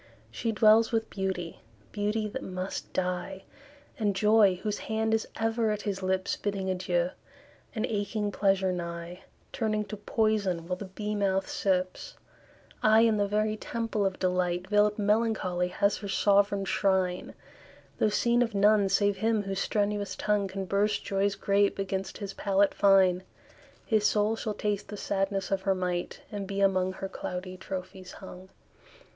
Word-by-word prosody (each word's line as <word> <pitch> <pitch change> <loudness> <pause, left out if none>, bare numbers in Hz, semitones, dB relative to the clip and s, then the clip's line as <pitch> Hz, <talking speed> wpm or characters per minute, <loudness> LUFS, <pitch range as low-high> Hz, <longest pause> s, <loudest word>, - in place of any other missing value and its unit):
She 230 - -2
dwells 220 +1 +5
with 225 -1 -1
Beauty 190 -3 -3 0.3
Beauty 210 +1 -1
that 265 +5 -5
must 185 0 -5
die; 180 +1 -3 0.6
And 205 -3 +1
Joy, 210 -1 +5
whose 210 -1 -2
hand 220 0 -1
is 220 - 0
ever 225 0 0
at 210 -1 -2
his 195 -2 -3
lips 185 0 0
Bidding 195 -2 -2
adieu; 180 -1 0 0.6
and 220 - 0
aching 205 0 -2
Pleasure 195 -1 +2
nigh, 170 0 -5 0.3
Turning 215 -2 -1
to 210 +1 -7
Poison 205 -5 0
while 180 - -1
the 200 - -6
bee 210 +3 -4
mouth 195 -2 0
sips: 185 - -1 0.7
Ay, 215 +1 +6
in 225 -2 +4
the 205 0 +1
very 215 +1 0
temple 225 -1 -2
of 190 -1 0
delight 180 -1 0
Veil'd 210 +1 +3
Melancholy 205 -4 +1
has 200 +3 +1
her 205 - -7
sovran 200 0 +2
shrine, 190 -2 0 0.6
Though 215 - +3
seen 235 +3 +2
of 230 -3 0
none 205 0 +4
save 205 0 +2
him 220 +1 +1
whose 195 -1 -3
strenuous 205 -2 -1
tongue 210 -1 0
Can 190 0 -5
burst 200 +2 0
Joy's 195 0 0
grape 200 0 +2
against 195 -1 -3
his 200 -2 -6
palate 200 0 +2
fine; 190 -2 +4 0.6
His 215 -2 +3
soul 210 +1 +2
shall 220 -1 -4
taste 205 -1 -2
the 210 - -7
sadness 195 0 -1
of 195 -1 +1
her 195 0 +1
might, 180 -1 -3
And 200 -2 -4
be 200 0 -3
among 185 -1 +2
her 195 - -5
cloudy 185 0 -6
trophies 185 0 -7
hung. 190 -1 -11
200 Hz, 160 wpm, -28 LUFS, 190-210 Hz, 0.7 s, Ay